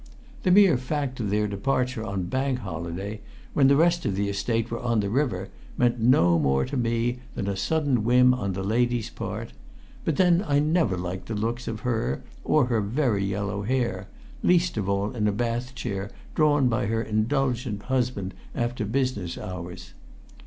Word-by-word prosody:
The - - +1
mere 185 -6 +6
fact 130 0 -3
of 105 -4 -1
their 105 +1 +1
departure 125 +4 -1
on 100 -3 -3
Bank 130 +7 -1
Holiday, 90 +4 -5 0.3
when 135 -2 +5
the 140 - +5
rest 170 +3 +3
of 100 - -1
the 100 +1 0
Estate 115 +3 -1
were 115 - -2
on 120 -2 +1
the 100 -1 -1
river, 115 -8 0 0.3
meant 120 -1 +2
no 90 -8 +4
more 70 -2 +2
to 140 - -5
me 120 0 0 0.2
than 100 - -3
a 100 - -1
sudden 135 +2 +1
whim 125 +2 +5
on 100 -6 -2
the 95 +1 -3
lady's 120 +2 0
part; - - -5 0.5
but 160 - 0
then 180 +1 +4
I 140 -1 +3
never 150 - +2
liked 90 +1 -5
the 115 - -3
looks 115 +4 -2
of 110 - -4
her 110 - -1 0.2
or 150 -4 +3
her 115 -3 +1
very 110 -1 0
yellow 100 +1 -2
hair, 120 +2 -1 0.3
least 175 0 +3
of 100 -3 -2
all 100 +1 0
in 105 -3 +1
a - - +3
bath 120 +4 -2
chair 100 -5 -4 0.2
drawn 145 -3 +3
by 115 -4 0
her 115 +1 0
indulgent 120 -1 -1
husband 125 -7 -1 0.2
after 120 -1 -1
business 110 -6 -1
hours. 90 -1 -7
115 Hz, 180 wpm, -26 LUFS, 100-130 Hz, 0.5 s, mere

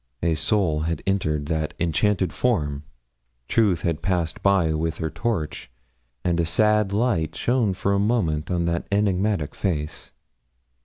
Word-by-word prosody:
A 85 -1 +2
soul 80 0 +1
had 80 0 -2
entered 80 -7 0
that 80 0 -2
enchanted 95 +3 +1
form. 75 - 0 0.6
Truth 100 -7 +2
had 85 -3 -1
passed 85 -4 -1
by 95 -5 +3
with 80 +1 -2
her 80 -1 -3
torch, 80 -11 -3 0.5
and 85 -1 +1
a - - +3
sad 105 +2 +3
light 100 -7 0
shone 120 -6 +1
for 100 +1 0
a 100 - +2
moment 95 -9 0
on 85 -2 0
that 85 0 -1
enigmatic 100 -4 +1
face. 75 -6 -3
85 Hz, 145 wpm, -24 LUFS, 80-100 Hz, 0.6 s, by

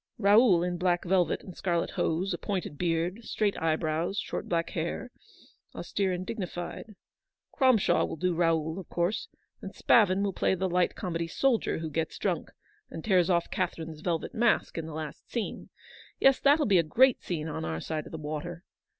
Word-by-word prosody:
Raoul 205 -4 +5
in 175 -1 -2
black 175 -1 +1
velvet 180 -1 +1
and 185 - -10
scarlet 170 -3 -1
hose, 180 +4 0
a 175 - -4
pointed 185 -7 -3
beard, 175 +6 -1
straight 210 -2 0
eye 160 -1 +2
brows, 160 +5 -2
short - - -4
black 170 -1 0
hair, 170 +9 -3 0.3
— - - -28
austere 195 -2 -1
and 180 0 -3
dignified. 190 +1 -6 0.6
Cromshaw 255 -7 +3
will - - -5
do 180 +2 0
Raoul, 165 0 +1
of 185 - -10
course; 175 +5 -1 0.3
and - - -8
Spavin 200 -4 +4
will 200 -1 -1
play 190 - +1
the 190 +1 -1
light 180 0 +1
comedy 170 -3 -3
soldier 245 +6 +1
who 160 -1 -4
gets 160 +2 -2
drunk, - - -2 0.4
and 160 - -8
tears 185 -4 +3
off 170 -2 +1
Catherine's 165 -4 -3
velvet 165 -1 -2
mask 235 +1 +2
in 165 -1 -4
the 160 - -7
last 155 -1 -7
scene. 235 -3 -4 0.5
Yes, 270 -1 +5
that'll 290 +2 +4
be 195 -4 +4
a - - +3
great 250 +11 +4
scene 160 -3 -3
on 155 - -4
our 80 -1 -3
side 155 - -4
of - - -12
the 160 - -5
water. 155 +3 -5
175 Hz, 185 wpm, -29 LUFS, 165-200 Hz, 0.6 s, Raoul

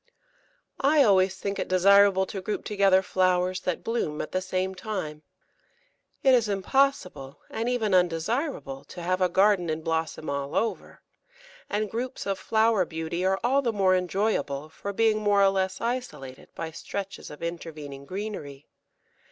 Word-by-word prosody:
I 290 +1 +5
always 190 -4 +4
think 200 +1 -3
it - - -2
desirable 195 +1 +5
to 195 0 -6
group 210 +3 -4
together 195 -2 +3
flowers 185 -1 +1
that 180 -2 -3
bloom 225 -10 -2
at - - -4
the 185 - -1
same 185 0 -2
time. 180 -6 -5 1.0
It 265 -2 +6
is 235 -4 +3
impossible, 195 - 0
and 230 +2 -2
even 225 -5 0
undesirable, 180 - 0
to 175 - -9
have 185 +2 0
a 180 - +3
garden 190 -1 +3
in 155 0 -3
blossom 160 -1 -2
all 140 +1 -3
over, 225 - -2 0.7
and 210 +1 -1
groups 250 +3 -4
of 195 -1 -2
flower 220 -3 +2
beauty 165 +1 -4
are 190 +1 +2
all 265 +4 +3
the 240 -4 0
more 195 -3 +3
enjoyable 180 -6 -1
for 200 +5 -6
being 220 +1 +2
more 205 -1 +3
or 195 - +6
less 190 -1 -1
isolated 230 - -4
by 165 -1 -5
stretches 195 +4 -6
of 150 - -10
intervening 155 -5 -6
greenery. 180 -7 -6
190 Hz, 155 wpm, -26 LUFS, 170-215 Hz, 1.0 s, It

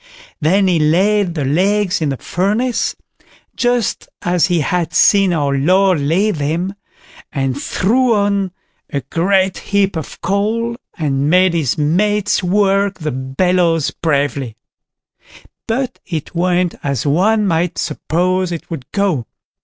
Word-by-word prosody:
Then 190 +5 +2
he 175 -3 +2
laid 185 +4 +2
the 145 -4 -1
legs 190 +6 +1
in 155 - 0
the 135 - -2
furnace, 215 - -1 0.6
just 245 -3 0
as 175 -1 +2
he 175 -3 +1
had 175 +3 -1
seen 195 -2 +5
our 145 -4 0
Lord 185 +5 +3
lay 170 +9 +1
them, 165 +4 -2 0.6
and 135 -3 -1
threw 230 - +1
on 200 -2 +1 0.4
a 140 - -2
great 185 +7 +1
heap 200 -2 0
of 160 - -6
coal, 215 +6 -1 0.2
and 140 -3 0
made 185 +1 +4
his 155 -7 0
mates 200 +8 +1
work 195 +1 +1
the 155 -3 -3
bellows 165 +5 +1
bravely; 140 -6 -1 1.1
but 255 +3 -2
it 160 -5 -5
went 180 0 +1
as 140 -3 -2
one 205 +9 +2
might 170 -1 0
suppose 180 +4 -1
it 170 0 -6
would 135 -6 -7
go. 185 - 0
180 Hz, 130 wpm, -17 LUFS, 155-200 Hz, 1.1 s, seen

